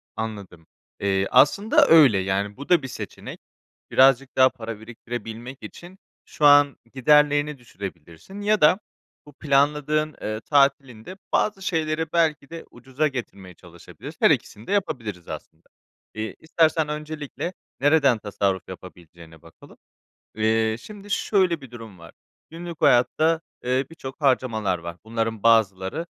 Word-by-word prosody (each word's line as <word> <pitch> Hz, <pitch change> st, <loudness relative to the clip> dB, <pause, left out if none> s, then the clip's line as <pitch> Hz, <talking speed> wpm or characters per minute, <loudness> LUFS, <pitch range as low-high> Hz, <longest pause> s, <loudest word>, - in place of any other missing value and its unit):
Anladım, 100 Hz, -7 st, -7 dB, 0.3 s
eee, 95 Hz, -1 st, 0 dB
aslında 145 Hz, -, +4 dB
öyle, 145 Hz, -11 st, +6 dB
yani, 95 Hz, +2 st, -2 dB
bu 140 Hz, -, -10 dB
da 175 Hz, -4 st, +4 dB
bir 135 Hz, -, -5 dB
seçenek. 110 Hz, -5 st, -8 dB, 0.5 s
Birazcık 135 Hz, 0 st, +3 dB
daha 130 Hz, 0 st, +6 dB
para 115 Hz, -3 st, -8 dB
biriktirebilmek 120 Hz, +2 st, -8 dB
için 180 Hz, +2 st, -12 dB, 0.3 s
şu 150 Hz, -, -5 dB
an 145 Hz, -1 st, +6 dB, 0.2 s
giderlerini 145 Hz, +2 st, +3 dB
düşürebilirsin 95 Hz, -, -10 dB
ya 210 Hz, +1 st, +1 dB
da 150 Hz, +5 st, +5 dB, 0.5 s
bu 145 Hz, -, -14 dB
planladığın, 150 Hz, +2 st, 0 dB
eee, 110 Hz, 0 st, -4 dB
tatilinde 140 Hz, +1 st, 0 dB, 0.2 s
bazı 195 Hz, -2 st, 0 dB
şeyleri 160 Hz, -3 st, -2 dB
belki 155 Hz, -4 st, 0 dB
de 165 Hz, 0 st, -8 dB
ucuza 130 Hz, +5 st, -2 dB
getirmeye 100 Hz, -9 st, -8 dB
çalışabilirs 85 Hz, -1 st, -13 dB
Her -, -, +5 dB
ikisini 105 Hz, -, -2 dB
de -, -, -4 dB
yapabiliriz, 115 Hz, -, -3 dB
aslında. -, -, -10 dB, 0.5 s
Eee, 110 Hz, 0 st, -5 dB
istersen 160 Hz, -1 st, +1 dB
öncelikle 150 Hz, +2 st, -5 dB, 0.3 s
nereden 140 Hz, -5 st, +3 dB
tasarruf 100 Hz, -2 st, -2 dB
yapabileceğine 85 Hz, -3 st, -13 dB
bakalım. 80 Hz, -, -17 dB, 0.6 s
Eee, 110 Hz, 0 st, +1 dB
şimdi 205 Hz, -, -12 dB
şöyle 185 Hz, -8 st, +1 dB
bir 135 Hz, -, -13 dB
durum 110 Hz, -6 st, -11 dB
var. 85 Hz, -, -13 dB, 0.4 s
Günlük 170 Hz, 0 st, -9 dB
hayatta, 155 Hz, +7 st, +3 dB, 0.2 s
eee, 130 Hz, +2 st, 0 dB
birçok 140 Hz, -4 st, -10 dB
harcamalar 120 Hz, -8 st, +1 dB
var. 85 Hz, 0 st, -8 dB
Bunların 115 Hz, -1 st, -3 dB
bazıları, 110 Hz, -, +2 dB
130 Hz, 130 wpm, -23 LUFS, 110-155 Hz, 0.6 s, öyle